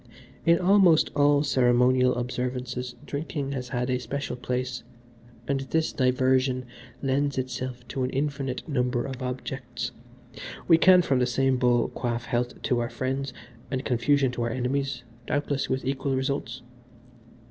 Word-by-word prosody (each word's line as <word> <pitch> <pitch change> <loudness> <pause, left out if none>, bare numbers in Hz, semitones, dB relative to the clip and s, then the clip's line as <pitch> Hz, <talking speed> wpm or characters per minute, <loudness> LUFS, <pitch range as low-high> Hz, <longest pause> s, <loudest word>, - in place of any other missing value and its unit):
In 170 0 +6
almost 180 -3 +5
all 145 0 +4
ceremonial 125 -1 +3
observances 125 0 -3
drinking 145 -1 -4
has 125 -3 -4
had 125 +1 -1
a 125 - +1
special 140 +3 -4
place, 125 0 -3 0.7
and 140 -1 +1
this 160 +4 -1
diversion 130 0 +2 0.4
lends 140 +1 0
itself 130 -1 -4
to 135 - -3
an 125 - 0
infinite 140 -1 -2
number 125 -4 0
of 135 -1 -6
objects 125 -1 -4 0.8
we 165 -2 +6
can 180 0 +7
from 135 -5 +1
the 125 - +2
same 135 +1 +2
bowl 125 -1 +2
quaff 120 -1 -3
health 120 +1 -2
to 125 -3 +1
our 120 0 -1
friends 130 +3 -2 0.4
and 130 -1 -3
confusion 135 +2 +2
to 125 - -4
our 120 - 0
enemies, 130 +2 -2 0.2
doubtless 145 -1 -1
with 130 0 -1
equal 135 0 -1
results. 130 -2 -2
130 Hz, 145 wpm, -26 LUFS, 125-140 Hz, 0.8 s, can